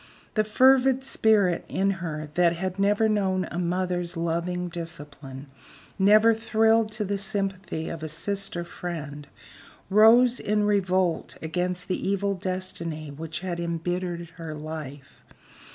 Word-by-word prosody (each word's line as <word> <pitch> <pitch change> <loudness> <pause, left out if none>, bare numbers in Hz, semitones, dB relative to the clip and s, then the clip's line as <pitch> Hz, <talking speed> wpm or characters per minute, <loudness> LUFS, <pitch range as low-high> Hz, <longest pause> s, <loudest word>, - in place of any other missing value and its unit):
The 215 - +2
fervid 260 +4 +4
spirit 215 -8 +3
in 195 +1 +1
her 155 -3 -5
that 170 0 +3
had 185 +2 -4
never 205 +2 +3
known 190 -3 +1
a 175 - -3
mother's 180 0 -1
loving 170 +2 -2
discipline, 145 -5 -7 0.5
never 215 +4 +6
thrilled 225 0 +2
to 215 -1 -2
the 200 0 -2
sympathy 195 -5 -3
of 165 - -6
a 155 - -4
sister 195 +2 -2
friend, 155 -5 -7 0.6
rose 235 +4 +6
in 210 0 0
revolt 185 -4 0
against 180 +2 -2
the 185 0 -2
evil 200 0 0
destiny 180 -5 -4
which 160 +2 -6
had 180 -2 -4
imbittered 170 0 -3
her 160 -2 -6
life. 150 -3 -8
180 Hz, 130 wpm, -26 LUFS, 165-205 Hz, 0.6 s, never